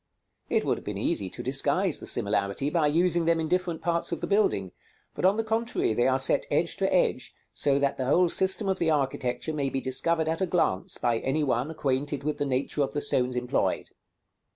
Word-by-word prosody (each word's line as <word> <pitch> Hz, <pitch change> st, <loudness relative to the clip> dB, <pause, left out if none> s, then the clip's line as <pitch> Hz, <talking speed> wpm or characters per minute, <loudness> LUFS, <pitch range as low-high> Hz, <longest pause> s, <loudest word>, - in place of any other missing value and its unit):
It -, -, +1 dB
would -, -, 0 dB
have -, -, -16 dB
been -, -, -5 dB
easy 95 Hz, -, -1 dB
to -, -, -7 dB
disguise 140 Hz, +7 st, +1 dB
the -, -, -8 dB
similarity 100 Hz, +5 st, -1 dB
by 160 Hz, -3 st, +2 dB
using 170 Hz, +2 st, +2 dB
them 165 Hz, 0 st, +2 dB
in 160 Hz, -, -1 dB
different 175 Hz, -2 st, -1 dB
parts 170 Hz, 0 st, -1 dB
of 170 Hz, -, -2 dB
the -, -, -3 dB
building; 200 Hz, -, +1 dB, 0.4 s
but -, -, -2 dB
on 195 Hz, +3 st, +4 dB
the 225 Hz, -, 0 dB
contrary 225 Hz, -, 0 dB
they 120 Hz, +3 st, +2 dB
are 130 Hz, 0 st, +3 dB
set 135 Hz, -, +1 dB
edge -, -, 0 dB
to -, -, 0 dB
edge, -, -, +1 dB, 0.2 s
so 140 Hz, -1 st, +1 dB
that 140 Hz, 0 st, 0 dB
the 130 Hz, -, -2 dB
whole 175 Hz, +7 st, +4 dB
system 190 Hz, +4 st, +1 dB
of 190 Hz, -, 0 dB
the 165 Hz, -, +1 dB
architecture 135 Hz, 0 st, -1 dB
may 140 Hz, -3 st, -1 dB
be 135 Hz, -, -2 dB
discovered 160 Hz, +5 st, +1 dB
at 160 Hz, +3 st, -1 dB
a 190 Hz, -, +1 dB
glance 165 Hz, -, 0 dB
by 115 Hz, -1 st, 0 dB
any 145 Hz, +5 st, -1 dB
one 130 Hz, 0 st, 0 dB
acquainted 140 Hz, -2 st, -2 dB
with 150 Hz, 0 st, -2 dB
the 145 Hz, -, 0 dB
nature 135 Hz, +2 st, -1 dB
of 140 Hz, -, -1 dB
the 145 Hz, -, -1 dB
stones 125 Hz, -3 st, +1 dB
employed. 125 Hz, 0 st, -1 dB
145 Hz, 220 wpm, -27 LUFS, 130-170 Hz, 0.4 s, on